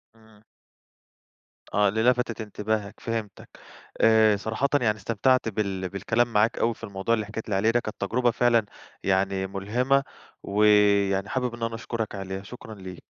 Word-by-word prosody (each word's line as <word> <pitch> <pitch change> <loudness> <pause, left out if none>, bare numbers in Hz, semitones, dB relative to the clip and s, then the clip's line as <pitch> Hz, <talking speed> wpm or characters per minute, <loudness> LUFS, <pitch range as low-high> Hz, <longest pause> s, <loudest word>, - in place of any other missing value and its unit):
إمم. 110 -1 -22 1.3
آه، 105 0 +4
اللي 110 +2 0
لفتت 125 -3 +1
انتباهك، 105 -1 -3
فهمتَك. 110 -3 -5 0.5
آآ، 110 -2 +5
صراحةً 110 +7 -1
يعني 110 -2 +1
استمتعت 115 +4 +1
بال 95 -3 -2
بالكلام 115 +4 0
معاك 105 +2 +2
أوي 115 0 +2
في 115 - -20
الموضوع 100 +2 -2
اللي 110 -2 -3
حَكيت 110 +1 -7
لي 100 - 0
عليه 110 +4 +3
ده، 120 - +2
كانت 110 -3 -8
تجرُبة 120 +4 +1
فعلًا 120 -2 +2 0.4
يعني 95 0 +1
مُلهمة، 125 +8 0 0.4
ويعني 100 -1 +3
حابب 125 -1 -1
إن 115 - -7
أنا 115 0 -2
أشكرَك 115 -2 -4
عليها. 95 0 -5
شكرًا 110 0 -10
ليك. 95 -2 -10
110 Hz, 155 wpm, -26 LUFS, 100-115 Hz, 1.3 s, آآ